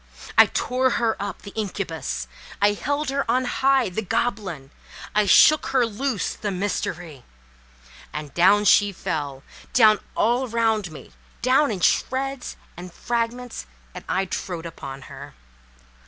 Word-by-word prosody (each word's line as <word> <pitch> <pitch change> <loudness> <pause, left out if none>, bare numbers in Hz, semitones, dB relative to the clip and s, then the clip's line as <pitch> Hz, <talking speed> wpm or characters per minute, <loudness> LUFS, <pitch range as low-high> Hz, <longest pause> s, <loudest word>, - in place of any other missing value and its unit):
I - - +8
tore 255 +1 0
her 230 -2 +1
up—the 200 0 -6
incubus! 165 - -4 0.3
I 205 +1 +4
held 285 +6 -2
her 280 0 0
on 255 +2 +2
high—the 250 -6 +1
goblin! 190 - -2 0.4
I 210 -1 +2
shook 305 +9 +6
her 260 -2 +2
loose—the 220 -2 -3
mystery! 175 -7 -4 0.9
And 150 -1 -7
down 200 +4 +4
she 205 0 +5
fell—down 160 - 0 0.2
all 245 +3 +1
around 220 -5 0
me—down 255 - -1
in 200 -5 -3
shreds 270 +6 0 0.2
and 180 +1 -9
fragments—and 230 - -5
I 190 +1 +1
trode 175 -2 -5
upon 135 -4 -8
her. - - -11
205 Hz, 115 wpm, -23 LUFS, 170-245 Hz, 0.9 s, I